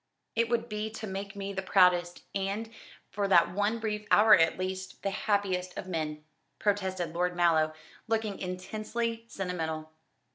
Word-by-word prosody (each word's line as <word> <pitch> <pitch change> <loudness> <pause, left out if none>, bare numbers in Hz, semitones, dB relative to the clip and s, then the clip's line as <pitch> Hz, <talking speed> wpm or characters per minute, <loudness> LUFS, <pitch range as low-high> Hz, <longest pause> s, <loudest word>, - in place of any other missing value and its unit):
"It 230 0 +2
would 235 0 0
be 210 -1 -3
to 220 - -5
make 195 0 -5
me 200 0 -4
the 190 - -2
proudest, 180 -2 +3
and 200 +3 -2 0.4
for 200 +1 0
that 175 -3 +5
one 205 +4 +1
brief 210 -2 -3
hour 215 +1 +7
at 165 -1 +3
least 185 0 -5
the 195 - 0
happiest 195 -3 0
of - - -4
men," 155 -3 -3 0.3
protested 185 -5 0
Lord 180 +1 0
Mallow, 160 -3 +3 0.3
looking 220 -3 -1
intensely 215 +5 -3
sentimental. 160 -6 -4
195 Hz, 150 wpm, -30 LUFS, 180-210 Hz, 0.4 s, hour